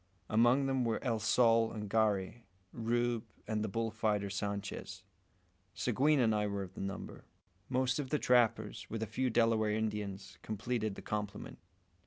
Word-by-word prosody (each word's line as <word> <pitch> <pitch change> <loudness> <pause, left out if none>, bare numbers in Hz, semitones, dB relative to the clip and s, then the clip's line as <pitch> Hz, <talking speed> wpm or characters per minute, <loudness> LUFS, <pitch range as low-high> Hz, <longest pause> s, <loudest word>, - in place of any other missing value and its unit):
Among 120 +5 +4
them 135 -1 +1
were 115 -2 +1
El 115 -4 0
Sol 115 +1 +4
and 105 -2 -5
Garey, 110 +1 0 0.3
Rube, 120 0 0 0.2
and 110 -1 -1
the - - -1
bull 115 +2 -2
fighter 105 -3 0
Sanchez. 100 0 -4 0.7
Seguin 140 - +2
and 115 -3 +3
I 105 -1 +1
were 100 -1 -2
of 95 -1 -10
the - - -7
number. 100 +1 -6 0.5
Most 130 0 +1
of 135 -3 -3
the 150 - +2
trappers, 120 -4 +2
with 110 0 -3
a - - 0
few 125 +4 -1
Delaware 115 -2 +3
Indians, 105 -2 -3
completed 110 -1 -2
the - - -9
complement. 105 -1 -4
110 Hz, 160 wpm, -34 LUFS, 105-120 Hz, 0.7 s, Among